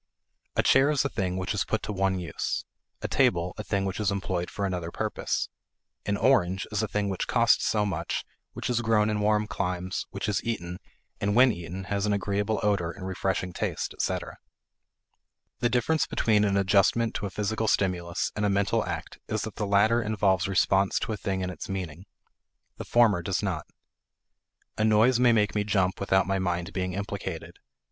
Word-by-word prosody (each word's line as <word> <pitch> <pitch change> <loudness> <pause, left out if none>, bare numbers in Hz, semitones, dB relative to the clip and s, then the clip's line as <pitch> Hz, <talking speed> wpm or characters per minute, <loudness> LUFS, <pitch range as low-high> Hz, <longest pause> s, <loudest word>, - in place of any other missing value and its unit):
A - - +3
chair 135 +2 +5
is 145 -2 +1
a - - +1
thing 95 -5 -2
which 95 +2 -2
is 105 - +1
put 110 - -2
to 105 - -3
one 95 -1 +1
use; 85 - -3 0.4
a - - 0
table, 85 +1 +2
a - - -3
thing 100 0 -1
which 95 +1 -3
is 105 -3 +1
employed 95 -3 -2
for 100 - -3
another 90 -3 -3
purpose; - - -2 0.6
an 100 0 +1
orange 95 -8 +2
is 105 - 0
a 110 - 0
thing 105 0 -1
which 95 -2 -2
costs 115 -1 +3
so 105 -1 +2
much, 100 - -2 0.3
which - - -4
is 120 -1 +1
grown 110 -2 +2
in 105 - -1
warm 105 +1 +2
climes, 90 -3 -3
which - - -4
is 105 - 0
eaten, 90 -6 -3 0.4
and 100 +1 0
when 125 +1 +7
eaten 90 0 -6
has 100 +1 -1
an 105 - +2
agreeable 100 +2 0
odor 100 -5 +1
and 95 +2 -7
refreshing 95 -1 -2
taste, - - -3
etc. - - -3 1.2
The 120 - +2
difference 125 +6 +1
between 105 -2 +2
an 100 -1 +1
adjustment 100 +4 +3
to 100 - -3
a - - -6
physical 110 +3 -2
stimulus 90 -4 0
and 105 - -2
a 105 - +3
mental 100 0 +1
act - - -5
is 110 -1 -2
that 110 -2 -6
the 105 - -1
latter 110 +4 +4
involves 100 -4 +1
response 95 0 +2
to 110 - -2
a - - -1
thing 95 0 -2
in 90 0 -2
its 90 - -8
meaning; 95 -2 -5 0.7
the - - -6
former 115 -7 +4
does 95 +4 -1
not. 90 -6 -2 1.1
A - - +3
noise 110 +3 +4
may 125 -1 +5
make 105 -2 +2
me 105 - +1
jump 95 -3 +1
without 95 -1 +2
my 95 0 0
mind 90 0 -2
being 90 -1 -2
implicated. 100 -3 -5
100 Hz, 195 wpm, -27 LUFS, 95-105 Hz, 1.2 s, when